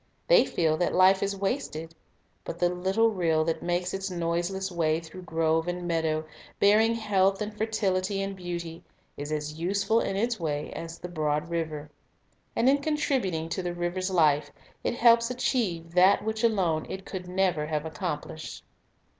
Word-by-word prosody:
They - - +6
feel 160 -2 +1
that 175 - 0
life 190 +1 +5
is 200 0 -1
wasted. 190 - -3 0.5
But 170 - -6
the 175 0 +2
little 190 +6 +2
rill 165 -5 +1
that 165 0 -1
makes 175 +1 -1
its 195 0 -3
noiseless 175 +2 -2
way 160 -2 +1
through 170 +3 -11
grove 160 -1 0
and 175 0 -3
meadow, 160 -2 0 0.3
bearing 220 +3 +5
health 195 -3 +2
and 210 0 -4
fertility 200 -3 0
and 195 0 -3
beauty, 170 -2 -6 0.3
is 145 +1 -6
as 150 0 -3
useful 200 +5 +1
in 195 - -1
its 230 +2 0
way 150 -2 -2
as 165 0 -7
the 180 - -7
broad 155 -2 -1
river. 155 -3 -3 0.6
And 235 - +2
in 280 +2 +5
contributing 265 - 0
to 185 - -2
the 175 -1 -3
river's 175 +2 -2
life, 150 -5 +3 0.3
it - - -1
helps 235 0 +5
achieve 220 -10 -1
that 185 +3 +5
which 220 +1 -2
alone 180 -9 +1
it 190 0 -6
could 180 -2 -6
never 180 -4 0
have 155 0 -2
accomplished. 155 0 -5
180 Hz, 165 wpm, -27 LUFS, 160-200 Hz, 0.6 s, They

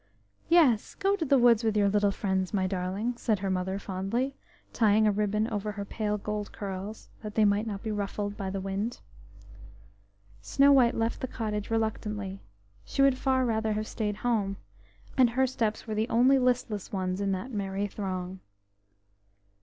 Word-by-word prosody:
"Yes! 290 -11 +4
go 390 +1 +1
to 400 - -2
the 275 -1 +4
woods 240 -2 +5
with 220 -1 +1
your 205 -1 +4
little 205 0 +3
friends, 190 -1 -1
my 190 -1 +1
darling," 190 +5 -2
said 220 -3 +1
her 195 0 -2
mother 185 +1 -1
fondly, 200 +8 -2 0.4
tying 215 -1 +4
a 210 - +4
ribbon 210 +1 0
over 210 0 -2
her 200 -1 -5
pale 210 0 -2
gold 210 0 -4
curls, 200 +2 -6
that 210 -2 -7
they 220 - +4
might 205 +2 +2
not 200 -2 -5
be 220 - -2
ruffled 205 0 -3
by 195 -2 -4
the 195 +1 -3
wind. 195 +5 -3 1.4
Snow 280 +1 +4
white 250 -4 +5
left 225 +1 -1
the 260 - -2
cottage 210 -4 -3
reluctantly; 210 -3 -2 0.4
she 275 - 0
would 270 -2 +4
far 260 -1 +2
rather 220 -2 0
have 215 +1 -2
stayed 210 -2 -2
at 210 - -11
home, 205 -5 +1 0.6
and 250 -2 +7
her 260 +3 +2
steps 225 -4 -2
were 220 - -4
the 215 +3 -1
only 255 +4 +5
listless 245 -5 0
ones 185 -1 -2
in 200 -1 0
that 190 +8 -4
merry 200 -2 -2
throng. 190 -2 -4
210 Hz, 175 wpm, -28 LUFS, 195-235 Hz, 1.4 s, and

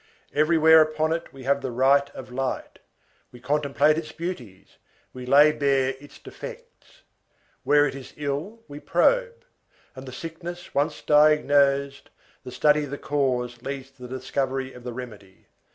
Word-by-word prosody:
Everywhere 160 +1 +5
upon 155 +1 0
it 165 - -5
we 135 -1 -12
have 140 +2 +1
the 135 - -3
right 135 +3 +3
of 130 -1 -9
light, 130 +1 -4 0.5
we 125 - -14
contemplate 150 +2 +1
its 160 - -8
beauties, 130 - -8 0.4
we 125 -1 -9
lay 145 +3 +6
bare 140 -3 +1
its 145 0 -15
defects. 485 +1 -12 0.6
Where 145 0 +4
it 145 - -2
is 135 -1 -10
ill, 150 +11 -4
we 145 0 -9
probe; 485 - +1 0.5
and 130 0 -10
the - - -7
sickness 170 +5 -8
once 145 +3 -1
diagnosed, 145 -2 +3 0.3
the 125 - -9
study 150 +2 +2
of - - -10
the 145 - -5
cause 125 -5 -2
leads 135 0 -6
to 135 -1 -25
the 130 +1 -5
discovery 130 0 -3
of 125 - -13
the 125 - -5
remedy. 105 -6 -10
140 Hz, 155 wpm, -24 LUFS, 130-155 Hz, 0.6 s, lay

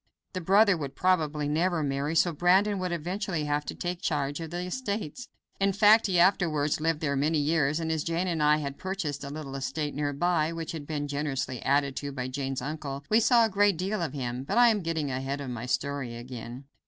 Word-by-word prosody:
The 185 - -3
brother 200 +3 +5
would 140 -4 -5
probably 155 -5 +1
never 165 +2 +1
marry, 140 +3 -1
so 170 +1 +3
Brandon 190 +5 +3
would 180 -1 -2
eventually 175 0 -2
have 145 0 -1
to - - -5
take 175 0 -4
charge 145 -1 -1
of 165 -1 -5
the 175 +2 -4
estates. 210 - -4 0.3
In 195 0 +2
fact, 215 +2 +6
he 185 -2 +1
afterwards 155 -5 +2
lived 160 -1 0
there 140 -3 0
many 150 +4 +1
years, 150 0 +1
and 160 -1 -2
as 160 -2 -1
Jane 170 +2 -1
and 170 -4 -1
I 150 0 +5
had 140 -2 -5
purchased 180 -7 -3
a 140 - -5
little 145 -2 -6
estate 145 +2 -3
near 145 0 -1
by, 160 +2 +1
which 165 -1 -5
had 150 -3 -7
been 145 -2 -3
generously 140 -4 -3
added 140 0 +1
to 145 -1 -4
by 130 -2 -4
Jane's 135 -1 -3
uncle, 145 -1 -5
we 220 - +6
saw 235 0 +5
a - - -1
great 200 -2 +3
deal 195 +3 -2
of 160 -5 -2
him. 125 -2 -3
But 200 +11 -2
I 240 0 +7
am 215 -3 +1
getting 160 -4 -2
ahead 135 +2 -3
of 135 -3 -5
my 120 0 -5
story 140 -3 -2
again. 120 +1 -8
155 Hz, 220 wpm, -28 LUFS, 140-180 Hz, 0.3 s, I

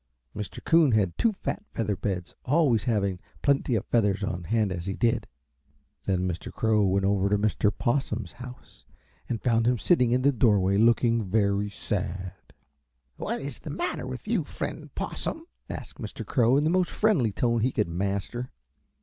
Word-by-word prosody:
Mr. 105 0 -6
Coon 165 -6 +5
had 100 -5 +2
two 230 - +2
fat 205 +1 -4
feather 105 -3 0
beds, 95 -2 -3
always 130 -7 +2
having 100 -6 0 0.2
plenty 140 -3 +2
of 105 - -1
feathers 105 -4 +1
on 90 -2 -3
hand 110 0 +1
as 85 0 -4
he 95 - -2
did. 120 -2 +1 0.8
Then 95 -1 +1
Mr. 85 -2 -4
Crow 110 -1 +2
went 95 +1 +1
over 100 0 +2
to 105 - +3
Mr. 105 0 +1
Possum's 115 - -1
house 125 0 -12 0.5
and 115 -3 -3
found 115 -2 +2
him 125 0 +3
sitting 125 -3 +3
in 125 +2 +2
the 140 - +5
doorway, 100 -6 +3
looking 115 0 +4
very 100 0 +1
sad. 95 -3 -3 0.8
"What - - -3
is 140 -2 -6
the - - -8
matter 350 - -3
with - - -7
you, - - +1
Friend - - -6
Possum?" 325 - -4 0.2
asked - - -7
Mr. - - -6
Crow 125 0 +3
in 145 - +2
the 155 - +2
most 180 -1 +2
friendly 180 - +2
tone 115 +2 +1
he 125 +4 +2
could - - 0
master. 100 +8 -3
110 Hz, 175 wpm, -27 LUFS, 100-125 Hz, 0.8 s, Coon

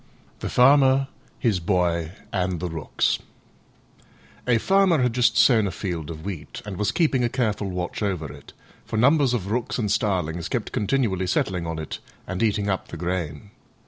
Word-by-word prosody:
THE - - -4
FARMER, 135 +1 +5 0.3
HIS 110 -7 +1
BOY, 85 -2 0 0.2
AND 90 -2 0
THE 90 +1 -3
ROOKS 80 -2 0 1.3
A 120 -2 +4
Farmer 190 - +3
had 125 -2 +1
just 120 -2 +3
sown 110 -6 +5
a - - -2
field 85 -7 -4
of 80 -1 -7
wheat, 85 -7 -6
and 100 -2 -5
was 105 +1 +1
keeping 145 -7 +2
a 120 - +2
careful 110 -5 -1
watch 90 +1 -4
over 90 -9 -2
it, - - -14 0.3
for 110 - -4
numbers 135 +1 +4
of 100 -3 -3
Rooks 120 +1 -1
and 105 -5 -1
starlings 90 -6 0
kept - - -2
continually 105 -4 0
settling 90 -1 0
on 80 -1 -3
it 80 -1 -5 0.3
and 95 0 -4
eating 105 -2 +1
up 95 -2 -1
the - - -8
grain. 85 0 -3
100 Hz, 175 wpm, -24 LUFS, 90-120 Hz, 1.3 s, FARMER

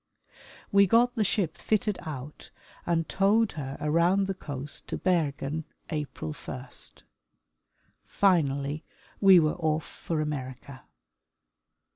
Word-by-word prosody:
We 200 -1 +6
got 240 +5 +4
the 220 - +1
ship 190 -5 0
fitted 210 -2 0
out 150 -1 -8 0.4
and 165 -1 +1
towed 205 +3 +3
her 135 -3 -6
around 170 +6 +3
the 195 - -2
coast 145 -5 -5
to - - -3
Bergen 160 -4 0 0.3
April 140 - -4
1. - - -8 1.3
Finally, 150 -5 +1 0.4
we 190 -3 +8
were 155 -2 +2
off 160 -2 0
for 165 -2 -4
America. 135 -3 -5
160 Hz, 110 wpm, -28 LUFS, 145-195 Hz, 1.3 s, we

